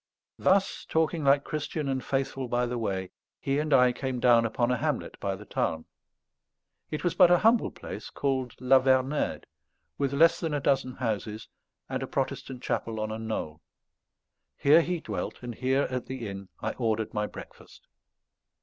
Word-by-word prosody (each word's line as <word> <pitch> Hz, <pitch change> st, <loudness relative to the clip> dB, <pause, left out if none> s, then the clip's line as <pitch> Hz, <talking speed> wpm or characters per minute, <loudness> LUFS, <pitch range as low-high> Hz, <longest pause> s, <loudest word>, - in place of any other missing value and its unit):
Thus, 190 Hz, +1 st, +2 dB
talking 160 Hz, 0 st, +1 dB
like 140 Hz, 0 st, +4 dB
Christian 150 Hz, 0 st, -3 dB
and 130 Hz, -1 st, -1 dB
Faithful 135 Hz, -1 st, -2 dB
by 120 Hz, +1 st, +1 dB
the 120 Hz, 0 st, -3 dB
way, 95 Hz, -4 st, -2 dB, 0.3 s
he 140 Hz, +1 st, 0 dB
and 150 Hz, 0 st, -2 dB
I 125 Hz, -2 st, +6 dB
came 130 Hz, 0 st, -3 dB
down 120 Hz, -2 st, +5 dB
upon 120 Hz, +2 st, 0 dB
a 125 Hz, -, +1 dB
hamlet -, -, -2 dB
by 100 Hz, -1 st, -2 dB
the 105 Hz, +2 st, -11 dB
Tarn. 80 Hz, -5 st, -2 dB, 1.0 s
It 155 Hz, -, -4 dB
was 175 Hz, -, +1 dB
but 180 Hz, -3 st, +6 dB
a 175 Hz, -, +6 dB
humble 225 Hz, +5 st, +3 dB
place, -, -, -8 dB
called 130 Hz, -3 st, -2 dB
La 130 Hz, +1 st, +5 dB
Vernède, 130 Hz, +2 st, +1 dB, 0.6 s
with 140 Hz, -1 st, +1 dB
less 165 Hz, +4 st, +5 dB
than 160 Hz, -3 st, -1 dB
a -, -, 0 dB
dozen 135 Hz, -2 st, +1 dB
houses, 110 Hz, -3 st, -3 dB, 0.4 s
and -, -, -3 dB
a -, -, -3 dB
Protestant 125 Hz, -2 st, -3 dB
chapel 110 Hz, -1 st, -2 dB
on 110 Hz, 0 st, -2 dB
a 110 Hz, -, -4 dB
knoll. 80 Hz, -9 st, -4 dB, 1.0 s
Here 150 Hz, +4 st, +6 dB
he 175 Hz, 0 st, -2 dB
dwelt; -, -, -5 dB
and 120 Hz, -1 st, -5 dB
here, 130 Hz, +4 st, +1 dB
at 125 Hz, -2 st, -3 dB
the 130 Hz, -4 st, -5 dB
inn, 100 Hz, -1 st, -7 dB
I 110 Hz, -, 0 dB
ordered 110 Hz, -3 st, -1 dB
my 105 Hz, 0 st, -1 dB
breakfast. -, -, -13 dB
130 Hz, 175 wpm, -28 LUFS, 110-140 Hz, 1.0 s, I